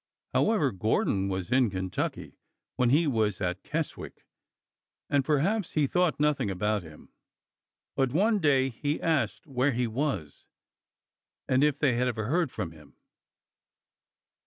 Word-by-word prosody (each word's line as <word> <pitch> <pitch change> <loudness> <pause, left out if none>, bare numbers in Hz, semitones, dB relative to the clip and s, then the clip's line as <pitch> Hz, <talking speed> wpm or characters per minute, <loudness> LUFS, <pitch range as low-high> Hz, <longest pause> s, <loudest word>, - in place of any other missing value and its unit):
However, 205 - +2
Gordon 100 -1 0
was 95 +2 -4
in 130 -2 +4
Kentucky 95 -1 -4 0.4
when 125 -2 +2
he 150 +6 +4
was 110 - 0
at 90 -1 -2
Keswick, 160 0 -5 0.9
and 140 -1 +3
perhaps 160 +8 0
he 150 -2 +2
thought 180 +2 +1
nothing 150 -7 +1
about 105 +2 0
him. 80 -3 -15 0.8
But 135 -2 +1
one 205 - +2
day 135 -5 +3
he 145 +5 -2
asked 145 -10 0
where 135 0 0
he 125 +1 0
was, 115 - -3 1.0
and 130 +2 +3
if 150 -2 +2
they 140 -5 +2
ever 120 -4 -1
heard 160 +2 +1
from 95 -6 -4
him. 75 -3 -17
130 Hz, 135 wpm, -28 LUFS, 105-150 Hz, 1.0 s, in